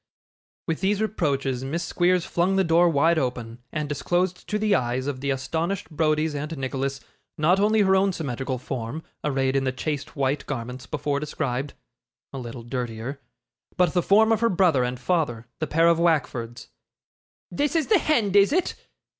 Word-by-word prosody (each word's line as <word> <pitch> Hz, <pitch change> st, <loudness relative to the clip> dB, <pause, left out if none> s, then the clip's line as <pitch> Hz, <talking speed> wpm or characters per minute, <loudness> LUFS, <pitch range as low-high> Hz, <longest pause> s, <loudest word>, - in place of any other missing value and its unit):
With 165 Hz, +1 st, -2 dB
these 200 Hz, +1 st, +1 dB
reproaches 140 Hz, -, -1 dB
Miss 160 Hz, +6 st, -2 dB
Squeers 175 Hz, 0 st, +1 dB
flung 180 Hz, +3 st, +1 dB
the 190 Hz, -, +3 dB
door 170 Hz, +1 st, +4 dB
wide 160 Hz, +2 st, +3 dB
open, 120 Hz, -3 st, -3 dB
and 150 Hz, -1 st, -2 dB
disclosed 175 Hz, +5 st, -1 dB
to 210 Hz, -, 0 dB
the 210 Hz, -1 st, +1 dB
eyes 130 Hz, 0 st, 0 dB
of 135 Hz, -2 st, -4 dB
the 140 Hz, -, -2 dB
astonished 160 Hz, +7 st, -2 dB
Browdies 155 Hz, 0 st, +1 dB
and 150 Hz, +2 st, -4 dB
Nicholas, 135 Hz, +1 st, -3 dB, 0.4 s
not 175 Hz, +5 st, +3 dB
only 215 Hz, +1 st, +3 dB
her 190 Hz, -1 st, +4 dB
own 195 Hz, +1 st, +3 dB
symmetrical 135 Hz, -5 st, -3 dB
form, 125 Hz, +5 st, -5 dB, 0.2 s
arrayed 135 Hz, -2 st, 0 dB
in 135 Hz, -, +2 dB
the 130 Hz, -, 0 dB
chaste 140 Hz, +3 st, -4 dB
white 140 Hz, 0 st, -1 dB
garments 125 Hz, -1 st, -5 dB
before 145 Hz, -1 st, -1 dB
described 140 Hz, -2 st, -3 dB, 0.6 s
(a 135 Hz, -, -5 dB
little 120 Hz, -1 st, -7 dB
dirtier), 120 Hz, +2 st, -5 dB, 0.6 s
but 180 Hz, -3 st, +3 dB
the 180 Hz, -, +3 dB
form 220 Hz, +5 st, +4 dB
of 225 Hz, -, +3 dB
her 230 Hz, -, +3 dB
brother 175 Hz, -, +3 dB
and 125 Hz, 0 st, -3 dB
father, 125 Hz, -5 st, -1 dB
the 155 Hz, -, -1 dB
pair 165 Hz, +4 st, +3 dB
of 170 Hz, -1 st, +4 dB
Wackfords. 135 Hz, -8 st, 0 dB, 0.8 s
'This 290 Hz, -, -1 dB
is 320 Hz, -3 st, +2 dB
the 420 Hz, -4 st, +4 dB
hend, 225 Hz, -12 st, +1 dB
is 200 Hz, 0 st, +6 dB
it? 360 Hz, +4 st, +1 dB
150 Hz, 175 wpm, -25 LUFS, 130-180 Hz, 0.8 s, is